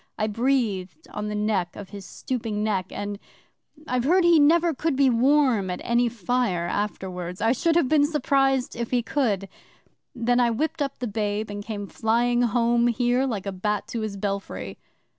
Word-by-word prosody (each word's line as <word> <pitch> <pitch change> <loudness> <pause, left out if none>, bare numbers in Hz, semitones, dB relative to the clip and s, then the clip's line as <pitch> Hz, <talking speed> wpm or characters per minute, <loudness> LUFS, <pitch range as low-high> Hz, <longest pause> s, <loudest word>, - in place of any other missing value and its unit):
I 215 - 0
breathed 230 - -1
on 210 0 -3
the 210 - -3
back 210 -5 -1
of 205 - -9
his 200 -2 -9
stooping 220 -4 -3
neck 195 -4 0
and 205 0 -5 0.7
I've 250 -1 0
heard 360 +5 +4
he 340 -2 +6
never 330 +3 +4
could 305 +1 -1
be 270 -1 +4
warm 250 -5 +3
at 180 - -3
any 240 0 +2
fire 225 -5 -1
afterwards. 180 -2 -4
I 225 +2 +2
should 325 +6 +1
have 340 -6 +3
been 290 0 +4
surprised 270 -4 +1
if 235 -1 -3
he 245 -2 +1
could! 215 -8 0 0.7
Then 245 0 +1
I 240 -1 +4
whipped 315 +7 -2
up 275 -1 -2
the 245 - -3
babe, 210 0 -2
and 205 0 -5
came 205 -2 -5
flying 240 +4 +1
home 235 0 +2
here 245 +2 +1
like 210 -6 -3
a 195 - -2
bat 210 +2 -2
to 230 -1 -3
his 215 -2 -4
belfry. 195 - -4
230 Hz, 180 wpm, -25 LUFS, 205-260 Hz, 0.7 s, he